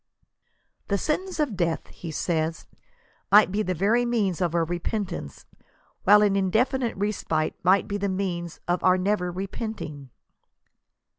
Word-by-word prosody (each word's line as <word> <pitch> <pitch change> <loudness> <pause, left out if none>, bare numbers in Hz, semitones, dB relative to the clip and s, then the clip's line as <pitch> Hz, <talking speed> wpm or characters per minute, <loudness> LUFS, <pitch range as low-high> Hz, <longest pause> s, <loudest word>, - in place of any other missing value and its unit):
The 200 - +1
sentence 360 - -2
of 285 -9 0
death,*' 170 -3 -1
he 170 - -9
says, 160 0 -2 0.7
"might 205 -1 +7
be 205 +2 0
the 185 -3 -1
very 215 +8 +2
means 210 -7 0
of 175 -2 0
our 165 -1 +2
repentance, 175 - -4 0.6
while 210 +2 +7
an 200 -1 +3
indefinite 230 +6 +1
respite 185 -6 -1
might 190 +2 +3
be 205 - -2
the 200 0 -1
means 175 -3 -3
of 175 +1 0
our 185 0 +5
never 185 -1 0
repenting." 185 - -6
190 Hz, 140 wpm, -25 LUFS, 175-210 Hz, 0.7 s, might